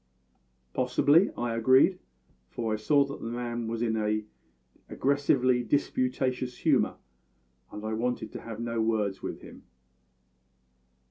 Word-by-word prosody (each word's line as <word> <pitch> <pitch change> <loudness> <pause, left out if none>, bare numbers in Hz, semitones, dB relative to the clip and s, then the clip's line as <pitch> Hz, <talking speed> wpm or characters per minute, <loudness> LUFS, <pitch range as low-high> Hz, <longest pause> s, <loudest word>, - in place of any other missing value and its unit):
"Possibly," 145 +7 +3
I 120 -1 -1
agreed, 130 - +4 0.5
for 115 -2 -3
I - - 0
saw 140 +6 +3
that 140 0 -8
the 115 - -4
man 120 -1 -3
was 115 +1 -2
in 110 -1 0
an 110 0 0 0.6
aggressively 130 -3 +2
disputatious 130 -1 -1
humour, - - +2 0.8
and 105 +1 -7
I 110 - -2
wanted 125 +3 -2
to - - -7
have 115 -1 -8
no 115 -1 -2
words 105 -3 0
with - - -6
him. - - -12
120 Hz, 130 wpm, -28 LUFS, 110-130 Hz, 0.8 s, agreed